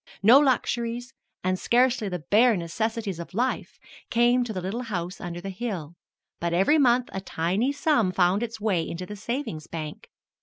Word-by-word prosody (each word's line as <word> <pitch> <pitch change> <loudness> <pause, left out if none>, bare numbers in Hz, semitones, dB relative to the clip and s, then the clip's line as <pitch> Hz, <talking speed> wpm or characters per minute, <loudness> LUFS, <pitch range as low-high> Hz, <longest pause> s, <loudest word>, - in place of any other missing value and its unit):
No 240 +7 +8
luxuries 245 -2 0 0.3
and 185 0 0
scarcely 245 -3 +2
the 180 -4 -5
bare 225 +1 +5
necessities 200 +2 -3
of 170 +2 -8
life 250 +4 -1 0.3
came 240 +1 +3
to 240 - -5
the 190 - -3
little 195 +7 -3
house 185 -6 -4
under 175 -1 -5
the 195 +2 -6
hill, 185 -7 -5 0.5
but 170 0 -1
every 195 - +4
month 250 -2 +3
a 190 - -3
tiny 190 +9 0
sum 285 - +2
found 185 +2 +2
its 230 -1 -4
way 205 -5 +1
into 170 +2 -5
the 210 - -7
savings 220 - -4
bank. 155 -2 -7
210 Hz, 175 wpm, -26 LUFS, 180-240 Hz, 0.5 s, No